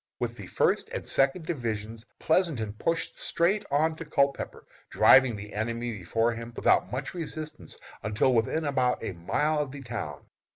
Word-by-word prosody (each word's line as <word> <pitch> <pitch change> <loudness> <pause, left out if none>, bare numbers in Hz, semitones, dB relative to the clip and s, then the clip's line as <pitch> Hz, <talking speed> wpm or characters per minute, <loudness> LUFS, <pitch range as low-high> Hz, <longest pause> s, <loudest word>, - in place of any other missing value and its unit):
With - - -2
the - - -9
First - - +1
and - - -5
Second 135 +5 +2
divisions 115 -6 -4
Pleasonton 155 - +1
pushed 165 +9 -2
straight 190 +5 +1
on 155 +3 +2
to 165 - -6
Culpepper, 140 -2 0 0.2
driving 130 -3 +6
the 105 0 -9
enemy 115 +2 -2
before 115 +4 0
him 115 0 -7
without 95 - +3
much 130 +2 -4
resistance 155 -3 -6 0.2
until 105 +5 +2
within 125 +8 +1
about 130 -4 +1
a 100 - -3
mile 150 - 0
of 145 -2 -1
the 140 0 -8
town. 110 - -5
125 Hz, 160 wpm, -28 LUFS, 110-155 Hz, 0.2 s, driving